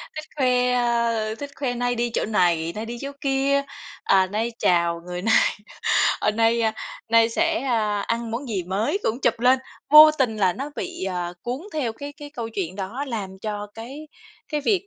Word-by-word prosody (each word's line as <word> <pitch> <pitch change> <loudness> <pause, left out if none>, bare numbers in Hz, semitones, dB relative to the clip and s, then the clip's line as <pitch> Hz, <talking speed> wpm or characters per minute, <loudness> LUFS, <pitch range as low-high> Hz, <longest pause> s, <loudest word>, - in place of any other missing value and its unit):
thích 310 - -5
khoe, 250 -2 +2
a, 235 -3 +1
thích 285 -1 -6
khoe 260 -3 -2
nay 245 0 -1
đi 240 +1 0
chỗ - - 0
này, 170 -6 +1
nay 215 +1 -4
đi 240 +1 -6
chỗ 275 - -5
kia, 275 0 +2 0.4
à, 190 -1 +4
nay 220 +4 -2
chào 170 -1 +2
người 180 0 -5
này, 225 +2 +3 0.9
ờ, - - +2
nay 230 +1 +2 0.5
nay 230 0 +5
sẽ, 230 - +1
a, 215 -5 0
ăn 230 +2 -2
món 245 +3 -4
gì 195 -5 -2
mới 200 - -1
cũng 235 +4 -1
chụp 230 -2 +1
lên. 255 +2 +5 0.3
Vô 305 +1 +10
tình 260 -7 0
là 190 -4 +2
nó 275 +7 -6
bị, - - -4
ờ, 180 -2 -3
cuốn 250 +4 -3
theo 260 -8 -1
cái 285 +4 -8
cái 290 -1 -11
câu 235 -6 -5
chuyện 190 -4 -4
đó, 215 +9 -4
làm 210 -5 -4
cho 210 0 -4
cái 275 +7 -9 0.4
cái 300 -1 -1
việc 390 +5 +1
230 Hz, 195 wpm, -23 LUFS, 205-270 Hz, 0.9 s, Vô